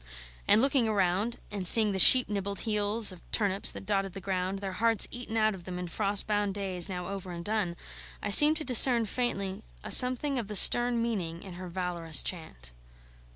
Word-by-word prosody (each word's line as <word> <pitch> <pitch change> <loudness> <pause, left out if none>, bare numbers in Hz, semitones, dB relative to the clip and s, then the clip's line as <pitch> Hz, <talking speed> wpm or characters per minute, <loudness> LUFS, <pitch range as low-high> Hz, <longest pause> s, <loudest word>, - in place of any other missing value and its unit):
And 220 - +2
looking 265 -5 -1
round, 200 +3 -3
and 195 -3 -5
seeing 215 0 +5
the 190 - -4
sheep 255 +5 +8
nibbled 200 -1 -6
heels 210 0 0
of 180 - -16
turnips 200 -3 -2
that - - -11
dotted 195 -2 -4
the 195 - -9
ground, 190 0 -5
their 195 -1 -8
hearts 225 +2 -1
eaten 240 -2 -7
out 215 -1 0
of 185 -2 -13
them 180 -1 -8
in 180 0 -8
frost 200 +3 -4
bound 205 -2 -3
days 190 -2 -1
now 180 -1 -7
over 195 -2 -9
and 170 0 -10
done, 205 -5 -4 0.4
I - - -6
seemed 300 +8 +8
to 310 - -6
discern, 245 -3 +4
faintly, 200 -4 -5 0.2
a - - -8
something 255 +2 +3
of 225 - -8
the 210 - -7
stern 240 +3 +5
meaning 175 -8 -6
in 190 - -12
her 180 +1 -11
valorous 175 -3 -2
chant. 60 - -6
200 Hz, 200 wpm, -26 LUFS, 185-225 Hz, 0.4 s, sheep